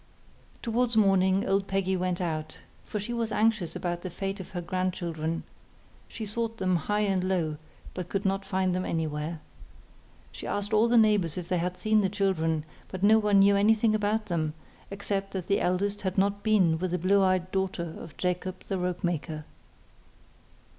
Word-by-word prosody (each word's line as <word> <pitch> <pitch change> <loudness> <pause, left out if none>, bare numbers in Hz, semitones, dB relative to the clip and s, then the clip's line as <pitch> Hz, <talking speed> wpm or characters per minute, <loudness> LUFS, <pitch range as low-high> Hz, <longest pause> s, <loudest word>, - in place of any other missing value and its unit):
Towards 235 0 +1
morning 195 -2 +4
old 195 0 +1
Peggy 195 -1 0
went 180 -1 -1
out, 155 -3 -3 0.3
for 210 - -4
she 220 +4 -4
was 230 -2 -1
anxious 215 -5 +1
about 175 -1 -3
the 185 - -5
fate 195 +3 -4
of 190 - -8
her 185 - -4
grandchildren. 170 -3 -2 0.6
She 220 - -6
sought 225 +2 -3
them 185 -2 +1
high 205 +5 0
and 195 -3 +1
low, 170 -5 0 0.4
but 180 -1 -5
could 200 +1 -2
not 195 0 +1
find 190 -1 0
them 185 0 -1
anywhere. 155 -1 -2 0.9
She - - -8
asked 205 +1 -1
all 215 +2 +5
the 235 0 +4
neighbours 210 -8 +3
if 175 -1 -5
they 180 - +1
had 180 +1 -2
seen 215 +3 +3
the 190 - +1
children, 165 -6 0 0.2
but 190 0 -6
no 220 +2 +6
one 210 -2 +3
knew 200 +1 +6
anything 215 +2 +4
about 215 +1 0
them, 160 -5 -1 0.3
except 195 0 -3
that 185 -3 -3
the 200 - +1
eldest 200 +3 0
had 190 -1 -2
not 200 +1 +2
been 190 -7 +3
with 185 +1 -1
the 180 - 0
blue 195 +3 +3
eyed 185 -1 +1
daughter 185 -4 -2
of 155 - -11
Jacob 180 0 -2
the 195 - -3
rope 180 0 -2
maker. 160 -3 -2
190 Hz, 180 wpm, -28 LUFS, 175-205 Hz, 0.9 s, no